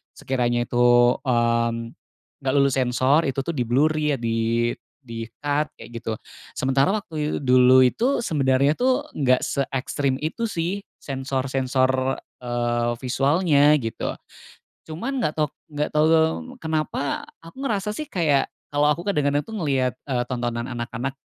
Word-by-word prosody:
sekiranya 120 -2 0
itu, 120 0 +4
mmm, 115 -2 +1 0.5
nggak 130 - 0
lulus 140 -2 +3
sensor, 130 +5 +3
itu 135 0 -2
tuh 170 - -2
di-blur 130 +5 +2
ya, 150 -2 +1
di 115 0 0 0.3
di-cut 130 +6 -3
kayak - - -12
gitu. 115 -1 -3 0.4
Sementara 135 +4 +2
waktu 155 -7 -3
dulu 130 0 +6
itu, 245 - +1
sebenarnya 140 - +2
tuh 255 - +1
nggak 130 -3 +2
seekstrem 135 0 -1
itu 195 +10 -2
sih 185 -1 -2 0.2
sensor-sensor, 130 -1 -1 0.3
eee, 120 -1 0
visualnya, 145 +3 +3
gitu. 115 - -3 0.7
Cuman 235 - -3
nggak 150 - +1
tahu 150 -1 +1 0.2
nggak 150 0 -1
tahu 150 +1 +4 0.5
kenapa 155 -2 -2 0.2
aku 165 0 -14
ngerasa 210 -5 -1
sih 305 - -5
kayak 150 -7 +2 0.2
kalau 145 +1 +3
aku 170 - -6
kadang-kadang 145 -5 +1
tuh 220 -1 -7
ngelihat, 135 -7 0
eee, 125 -2 0
tontonan 120 -1 -3
anak-anak 120 +2 -4
135 Hz, 130 wpm, -23 LUFS, 120-150 Hz, 0.7 s, dulu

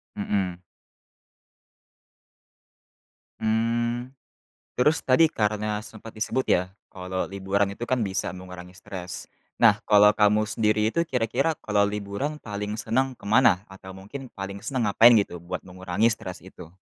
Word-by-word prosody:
Mhm. 95 -3 -2 2.8
Mmm. 115 +2 0 0.6
Terus 150 +6 +3
tadi 150 +5 +4
karena 105 0 -1
sempat 110 0 -11
disebut 115 +4 -1
ya, 90 - +4 0.3
kalau 95 0 -4
liburan 100 +1 0
itu 120 +4 -6
kan 125 -3 +1
bisa 95 -2 -2
mengurangi 90 0 -10
stres. 90 -3 -7 0.3
Nah, - - +5
kalau 105 0 +7
kamu 105 0 +3
sendiri 105 0 +1
itu 170 +4 0
kira-kira 130 +5 0
kalau 100 -1 +2
liburan 105 +9 -3
paling 105 0 -4
senang 130 +4 -1
ke - - -27
mana? 110 -3 +4
Atau 95 0 -11
mungkin 105 +8 -9
paling 100 0 -6
senang 120 -5 -1
ngapain 120 +3 +7
gitu, 100 -5 0
buat 90 +2 -6
mengurangi 95 +4 0
stres 90 -4 -6
itu? 85 +2 -13
105 Hz, 130 wpm, -25 LUFS, 95-115 Hz, 2.8 s, kalau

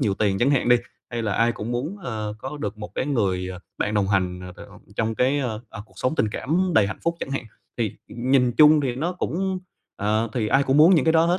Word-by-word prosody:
nhiều 100 -2 +1
tiền 100 -2 +1
chẳng 125 +6 +3
hạn 135 -3 +2
đi, 120 - +7 0.3
hay 120 -1 -3
là 105 -2 -1
ai 115 +1 +2
cũng 110 +3 -5
muốn, 145 +12 -3
ờ, 110 -3 -4
có 135 +6 -6
được 105 -5 -5
một 105 - -8
cái 130 - -1
người, 95 -9 0
ờ, 90 -1 -7 0.2
bạn 105 - -1
đồng 100 -2 +1
hành, 90 -2 0
ờ, 90 0 -8
t - - -22
ông - - -15 0.2
trong 110 0 0
cái, 130 +5 +2
ơ, 115 -5 -2
ờ, 105 - -8
cuộc - - -25
sống 130 - 0
tình 110 - +1
cảm 175 - 0
đầy 105 -3 +5
hạnh 95 - -5
phúc 170 0 0
chẳng - - -4
hạn. 135 - -2 0.3
Thì 110 -4 0 0.2
nhìn 125 0 +2
chung 150 +2 +7
thì 130 -3 -1
nó 170 +6 -1
cũng 185 +1 -2 0.4
ờ, 110 +3 +1
thì 115 -4 -1
ai 135 +4 +4
cũng 135 +1 +1
muốn 165 +5 +7
những 155 - +3
cái 160 - +4
đó 165 0 +5
hết, 175 +2 +2
120 Hz, 270 wpm, -24 LUFS, 105-145 Hz, 0.4 s, đi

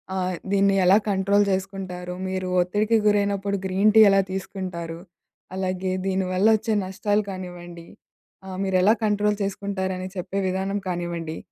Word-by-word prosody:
ఆహ్, 185 -1 -1 0.2
దీన్ని 200 0 +3
ఎలా 190 +3 +6
కంట్రోల్ 200 +1 +3
చేసుకుంటారు 190 -2 -4 0.2
మీరు 185 -1 -3
ఒత్తిడికి 210 +5 +1
గురైనప్పుడు 200 -1 +1
గ్రీన్ 195 +3 +3
టీ 220 - +9
ఎలా 195 0 +4
తీసుకుంటారు, 180 -3 -5 0.6
అలాగే 185 0 -2
దీని 190 0 0
వల్ల 190 +4 +3
వచ్చే 220 +1 -2
నష్టాలు 205 +2 0
కానివ్వండి, 175 -2 -8 0.6
ఆహ్, 185 - -6
మీరు 190 -1 +1
ఎలా 205 +4 +5
కంట్రోల్ 210 0 +1
చేసుకుంటారని 190 -2 -3
చెప్పే 185 +2 -3
విధానం 190 +2 -1
కానివ్వండి, 170 -2 -4
190 Hz, 135 wpm, -24 LUFS, 185-200 Hz, 0.6 s, టీ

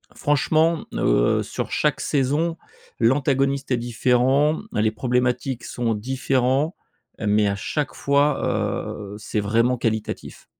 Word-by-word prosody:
franchement, 155 +3 +2
heu, - - +2
sur - - -4
chaque - - +1
saison, 150 +4 0 0.4
l'antagoniste 135 +2 +1
est 125 - +3
différent. 125 +5 +2
Les 110 +1 +2
problématiques 125 +2 -1
sont 115 -2 -1
différents, 130 - 0 0.4
mais 105 0 +2
à 100 - 0
chaque 145 +9 -3
fois, 140 0 +2
heu, 100 -1 -3
c'est 105 0 -2
vraiment 115 +5 +2
qualitatif. 110 -2 -3
125 Hz, 115 wpm, -23 LUFS, 115-140 Hz, 0.4 s, est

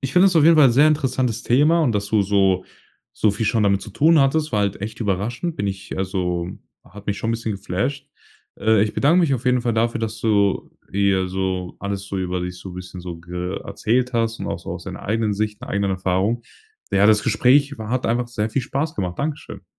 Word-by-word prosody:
ich 135 -1 -3
finde 180 +2 +6
das 180 -3 +3
auf 155 - +5
jeden 165 +1 +7
Fall 150 -3 +7
'n - - +2
sehr 140 +5 +5
interessantes 130 -6 0
Thema, 150 +7 +3
und 130 -7 +2
dass 100 -1 -1
du 105 0 +2
so 95 -2 +2 0.5
so 110 - +3
viel 105 +2 -2
schon 110 0 +2
damit 100 -1 +2
zu 110 - -9
tun 155 - +4
hattest, 150 +3 +2
war 105 - +2
halt 100 -1 -1
echt 105 +2 -6
überraschend. 115 - -2
Bin 100 - -2
ich 95 -1 -6
also, 90 -2 -2 0.4
hat 105 +2 -14
mich 100 -1 -1
schon 115 - -2
'n - - +1
bisschen 115 -1 -3
geflasht. 100 +8 -3 0.5
Äh, 110 -2 +4
ich 105 - -1
bedank 155 +6 +3
mich 155 -6 +2
auf 125 -1 -5
jeden 125 -1 +3
Fall 120 - 0
dafür, 115 +1 +1
dass 110 0 -4
du 100 -3 +1 0.2
hier 95 -1 +1
so 95 -1 -3
alles 100 0 -4
so 100 - -4
über 90 -1 -2
dich 90 0 -5
so 95 0 -9
bisschen 90 0 -8
so 90 -1 -7
ge 90 +2 -5
erzählt 125 +3 0
hast 115 -1 0
und - - -5
auch - - -3
so - - -8
aus - - -6
deiner - - -7
eigenen 110 0 0
Sicht, 105 +1 -3
'ner - - -8
eigenen 100 0 0
Erfahrung. 95 +5 0 0.5
Ja, 100 +1 +4
das 105 -1 +4
Gespräch 135 +5 +3
war 110 -1 -6
hat 130 +1 0
einfach 120 +1 0
sehr 110 -2 -2
viel 130 +3 -1
Spaß 145 +5 -2
gemacht. 90 -3 -4
Dankeschön. 150 +1 -5
110 Hz, 235 wpm, -21 LUFS, 95-125 Hz, 0.5 s, jeden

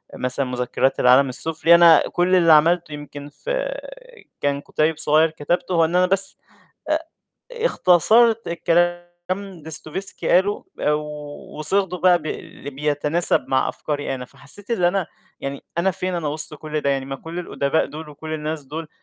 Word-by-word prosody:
مثلًا 125 +2 -1
مذكرات 125 +1 -1
العالم 130 +2 +5
السفلي، 160 +5 +2
أنا 170 -1 +7
كلّ 180 +1 +2
اللي 165 -3 +6
عملته 165 +1 +3
يمكن 145 0 -9
في - - -7
آآ، - - -6 0.2
كان 140 0 0
كُتيب 155 +1 0
صغيّر 155 +2 +3
كتبته، 175 +4 -2
هو 165 -1 +4
إن 170 +2 -2
أنا 180 0 +4
بس 195 +1 +2 0.5
آآ 310 +1 +1 0.5
اختصرت 230 - +4
الكلام 175 +1 +1 0.2
اللي 190 -3 -5
ديستوفيسكي 160 +4 -5
قاله 195 +3 +2 0.9
وصيغته 180 +3 0
بقى 180 0 +4
بي 145 -2 -7
بيتناسب 150 +4 +2
مع 130 0 +1
أفكاري 145 -2 -4
أنا، 125 -1 -6
فحسّيت 205 - -8
إن 185 -7 0
أنا 180 0 +1 0.3
يعني 140 0 -6
أنا 190 +3 +2
فين 185 0 -3
أنا 165 -3 -2
وسط 155 +1 -4
كلّ 155 +1 -4
ده 140 - 0
يعني 135 -1 -1
ما 135 0 -5
كلّ 165 +5 -8
الأدباء 160 -3 -1
دُول 155 +1 -9
وكلّ 155 +2 -7
الناس 155 -1 -4
دول 155 +3 -7
160 Hz, 160 wpm, -21 LUFS, 145-185 Hz, 0.9 s, أنا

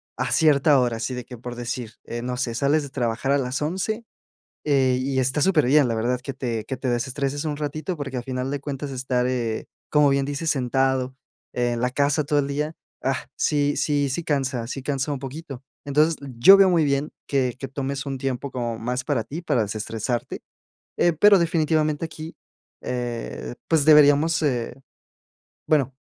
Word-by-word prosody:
a - - -2
cierta 145 -2 +4
hora. 120 -2 0
Así 125 +3 -3
de 125 -1 -6
que, 125 -3 -10
por 120 0 -7
decir, 120 -1 -5
eh, 120 0 -5
no 125 +1 -3
sé, 120 -2 -2
sales 145 +5 +2
de 140 - -7
trabajar 120 0 -1
a 140 - +3
las 130 0 -2
11, 190 +8 -2 0.6
eh, 135 -4 +3
y 130 0 -1
está 130 +3 +1
superbien, 150 -6 +4
la 115 - 0
verdad, 120 +3 0
que 135 - -5
te 120 -4 -3
que 130 - -4
te 130 +1 -3
desestreses 135 +4 -2
un 150 -1 -1
ratito, 155 +4 -3
porque, 140 -3 -4
a 120 - -3
final 130 +1 -3
de 145 - -2
cuentas, 140 0 -5
estar, 125 -1 -1
eh, 120 -3 -2 0.2
como 150 -1 +5
bien 140 0 +2
dices, 145 +3 -2
sentado 130 -1 0 0.4
en 120 -1 0
la 125 - +1
casa 145 +3 +1
todo 145 +1 +1
el 140 - 0
día, 150 +3 -2 0.3
ah, 135 +3 -1
sí 145 -1 +1
sí 145 -2 +1
sí 155 +6 -2
cansa 135 -5 -1
sí 135 +2 -5
cansa 135 +1 -2
un 140 - -3
poquito. 135 -1 -8 0.2
Entonces, 150 +3 +3 0.2
yo 195 +11 +9
veo 195 -1 +6
muy 170 -3 +3
bien 140 +1 0 0.2
que 130 -3 0
que 135 - -4
tomes 135 +1 -4
un 135 -1 -3
tiempo 135 +1 -3
como 120 -3 -3
más 125 +2 -2
para 135 -7 0
ti, 165 +8 -7
para 120 - +1
desestresarte. 110 +4 -3 0.6
Eh, 175 - +4
pero, 200 +5 +6
definitivamente, 155 -2 +1
aquí, 160 0 -8 0.5
eh, 90 - -4
pues, 160 -3 +3
deberíamos, 150 +1 +6
eh, 125 -3 -1 0.9
bueno, 140 -4 +2
135 Hz, 185 wpm, -24 LUFS, 125-150 Hz, 0.9 s, yo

